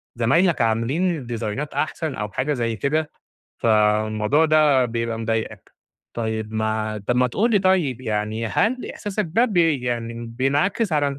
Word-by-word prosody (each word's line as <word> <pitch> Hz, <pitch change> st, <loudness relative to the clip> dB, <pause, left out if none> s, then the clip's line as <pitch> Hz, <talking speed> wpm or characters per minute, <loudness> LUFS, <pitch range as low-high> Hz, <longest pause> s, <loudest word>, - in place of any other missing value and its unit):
زمايلك 165 Hz, +9 st, +2 dB
عاملين 130 Hz, +8 st, 0 dB
ديزاينات 115 Hz, +4 st, -4 dB
أحسن 155 Hz, -1 st, -2 dB
أو 105 Hz, -1 st, -4 dB
حاجة 145 Hz, +3 st, -1 dB
زي 115 Hz, -3 st, -1 dB
كده، 150 Hz, +4 st, -1 dB, 0.5 s
فالموضوع 110 Hz, +5 st, +2 dB
ده 150 Hz, -4 st, +4 dB
بيبقى 115 Hz, -1 st, -2 dB
مضايقك. 110 Hz, -2 st, -3 dB, 0.4 s
طيب 110 Hz, -1 st, -3 dB
ما 110 Hz, 0 st, -1 dB
طب 125 Hz, -, +1 dB
ما 125 Hz, 0 st, +4 dB
تقول 220 Hz, -, 0 dB
لي 205 Hz, -, +4 dB
طيب 180 Hz, -, +1 dB
يعني 110 Hz, 0 st, -2 dB
هل 225 Hz, -, 0 dB
إحساسك 205 Hz, 0 st, -3 dB
ده 235 Hz, +5 st, +4 dB
ب 210 Hz, -7 st, -3 dB
يعني 120 Hz, -7 st, 0 dB
بينعكس 145 Hz, -, 0 dB
على 140 Hz, -2 st, 0 dB
125 Hz, 145 wpm, -22 LUFS, 110-155 Hz, 0.5 s, ده